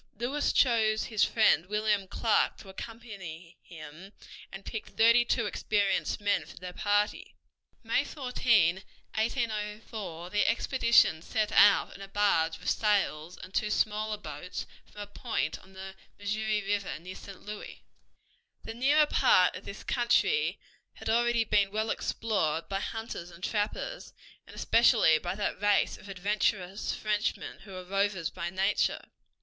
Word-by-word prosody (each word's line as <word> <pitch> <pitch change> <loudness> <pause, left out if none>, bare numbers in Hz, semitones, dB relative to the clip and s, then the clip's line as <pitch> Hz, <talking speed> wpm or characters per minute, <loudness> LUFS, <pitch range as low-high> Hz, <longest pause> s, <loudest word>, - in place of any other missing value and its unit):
Lewis 265 +6 0
chose 220 -4 +3
his 215 -3 +1
friend 215 -6 +3
William 210 -1 0
Clark 220 +3 +1
to 195 - -13
accompany 190 -6 -9
him, 165 +4 -12 0.4
and 195 0 -9
picked 220 - -7
thirty 230 +2 +6
two 235 -1 0
experienced 205 -1 0
men 205 0 +1
for - - -14
their 180 0 -8
party. 205 +2 0 0.5
May - - +1
14, 235 - +2 0.4
1804, 210 -5 -3
the 210 - +2
expedition 230 -8 +3
set 215 +3 -1
out 205 -1 +5
in - - -12
a 195 - -7
barge 195 -5 +1
with 180 - -1
sails 180 -6 0
and 190 - -11
two 210 - 0
smaller 215 0 0
boats 155 -1 -7 0.3
from 210 - -9
a - - -5
point 205 -6 -3
on 190 - -19
the 190 0 -8 0.2
Missouri 210 +1 -1
River 200 0 -2
near 180 +4 -9
St. 195 -1 -12
Louis. 210 0 -8 0.8
The - - -6
nearer 285 +6 +4
part 185 -10 +4
of 185 - -9
this 200 - -8
country 270 - +1 0.4
had - - -3
already 240 0 +2
been 205 -2 +2
well 215 +2 -1
explored 165 -8 -1
by 195 0 -2
hunters 220 -5 -5
and 170 0 -15
trappers, 215 - -3 0.3
and - - -13
especially 225 -9 +4
by 175 +3 -4
that 205 -1 -3
race 205 -1 +2
of 200 - -13
adventurous 195 0 -1
Frenchmen 210 -1 -2
who 195 - -12
were 185 -1 -7
rovers 195 -3 -1
by 170 -1 -4
nature. 190 +3 0
205 Hz, 145 wpm, -29 LUFS, 185-220 Hz, 0.8 s, thirty